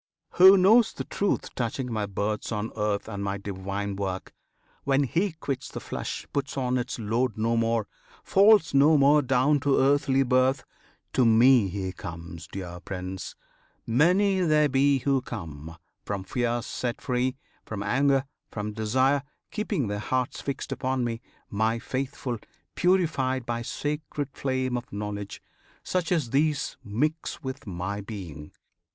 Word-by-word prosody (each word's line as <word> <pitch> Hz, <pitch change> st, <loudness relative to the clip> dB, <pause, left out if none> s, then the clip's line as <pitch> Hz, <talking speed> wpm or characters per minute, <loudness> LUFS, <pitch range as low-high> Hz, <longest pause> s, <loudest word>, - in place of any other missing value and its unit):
Who 190 Hz, +2 st, +8 dB
knows 215 Hz, +5 st, +5 dB
the -, -, -5 dB
truth 200 Hz, -1 st, -1 dB
touching 125 Hz, +1 st, -3 dB
my 105 Hz, -2 st, -1 dB
births 105 Hz, +3 st, -2 dB
on 105 Hz, 0 st, -2 dB
earth 105 Hz, -1 st, -1 dB
And 100 Hz, -2 st, -4 dB
my 100 Hz, 0 st, -2 dB
divine 100 Hz, 0 st, -4 dB
work, 95 Hz, -1 st, -4 dB, 0.5 s
when 140 Hz, 0 st, +2 dB
he 175 Hz, +7 st, 0 dB
quits 135 Hz, -4 st, -4 dB
the -, -, -6 dB
flesh -, -, -5 dB
Puts 140 Hz, 0 st, -2 dB
on 125 Hz, -1 st, +1 dB
its 125 Hz, +1 st, -4 dB
load 115 Hz, +1 st, -1 dB
no 115 Hz, +2 st, +1 dB
more, 115 Hz, -2 st, +1 dB, 0.4 s
falls 200 Hz, -4 st, +5 dB
no 145 Hz, +3 st, +6 dB
more 145 Hz, +2 st, +5 dB
down 135 Hz, +2 st, +2 dB
To 140 Hz, 0 st, +2 dB
earthly 135 Hz, 0 st, +3 dB
birth: 130 Hz, +1 st, +2 dB, 0.5 s
to 130 Hz, -, +3 dB
Me 115 Hz, 0 st, +6 dB
he 95 Hz, 0 st, -3 dB
comes, 85 Hz, -3 st, -8 dB
dear 90 Hz, -2 st, -7 dB
Prince! 95 Hz, +1 st, -6 dB, 0.5 s
Many 180 Hz, -, +3 dB
there 155 Hz, -4 st, +4 dB
be 140 Hz, +1 st, +3 dB
who 135 Hz, 0 st, +1 dB
come! 80 Hz, -, -8 dB, 0.3 s
from 100 Hz, -2 st, -3 dB
fear 120 Hz, +2 st, -1 dB
set 120 Hz, -2 st, -3 dB
free, 125 Hz, +1 st, -1 dB, 0.3 s
From 105 Hz, -2 st, -5 dB
anger, 135 Hz, +5 st, +2 dB, 0.2 s
from 105 Hz, 0 st, -4 dB
desire; 130 Hz, +6 st, +2 dB, 0.3 s
keeping 210 Hz, -, -1 dB
their 105 Hz, 0 st, -3 dB
hearts 125 Hz, +3 st, -2 dB
Fixed 140 Hz, -1 st, -4 dB
upon 130 Hz, -1 st, -1 dB
me 115 Hz, -1 st, -3 dB, 0.3 s
my 110 Hz, +2 st, +1 dB
Faithful 130 Hz, -1 st, -4 dB, 0.3 s
purified 155 Hz, -9 st, +1 dB
By 120 Hz, -1 st, -2 dB
sacred 145 Hz, +2 st, -3 dB
flame 130 Hz, -2 st, -1 dB
of 120 Hz, -, -8 dB
Knowledge. 100 Hz, -1 st, -5 dB, 0.4 s
Such 180 Hz, -2 st, -1 dB
as 155 Hz, -10 st, +1 dB
these 145 Hz, +1 st, +1 dB
Mix 150 Hz, +11 st, -2 dB
with 130 Hz, -4 st, -6 dB
my 95 Hz, +2 st, -4 dB
being. 90 Hz, -8 st, -8 dB
125 Hz, 145 wpm, -27 LUFS, 105-140 Hz, 0.5 s, Who